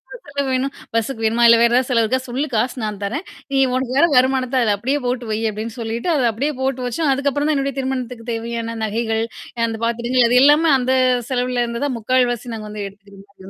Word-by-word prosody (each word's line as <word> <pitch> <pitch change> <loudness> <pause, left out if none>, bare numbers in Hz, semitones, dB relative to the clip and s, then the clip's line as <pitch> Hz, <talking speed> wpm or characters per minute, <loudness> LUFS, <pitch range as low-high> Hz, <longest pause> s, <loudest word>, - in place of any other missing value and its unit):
எ - - -8
செலவு 280 -1 -2
வேணும் 270 +2 -1 0.2
பஸ்க்கு 230 +1 -1
வேணுமா? 230 +2 +2
இல்ல 230 0 +7
வேற 235 - +5
ஏதாவது 255 +1 +2
செலவுக்காக 240 +1 +2
சொல்லு. 255 +4 -2
காசு 240 +4 0
நான் 210 -2 -3
தரேன். 280 - -3 0.3
நீ 275 - +1 0.2
உனக்கு 255 -1 -1
வர்ற 335 - +6
வருமானத்த 260 0 +2
அதுல 215 -3 +2
அப்டியே 265 +8 -1
போட்டு 245 0 -2
வை" 215 - 0
அப்டின்னு 215 +2 -6
சொல்லிட்டு 230 +5 -4
அத 265 -4 +2
அப்டியே 280 +7 -2
போட்டு 265 -1 -1
வச்சோம். 280 +4 0
அதுக்கப்புறம் 280 +2 0
தான் 310 - +2
என்னுடைய 275 -1 -2
திருமணத்துக்கு 250 -3 -4
தேவையான 230 0 -4
நகைகள், 225 +1 -1 0.4
அந்த 225 -1 -4
பாத்திரங்கள் 235 +1 +2
அது 250 +1 +5
எல்லாமே 300 +3 +5
அந்த 255 +1 0 0.4
செலவுல 250 -1 0
இருந்து 235 +2 -4
தான் 270 - -2
3/4 255 +3 +2
வாசி 240 0 -5
நாங்க 215 -1 -7
வந்து 210 -1 -5
எடுத்துருந்தோம். 200 0 -18
245 Hz, 205 wpm, -20 LUFS, 225-265 Hz, 0.4 s, இல்ல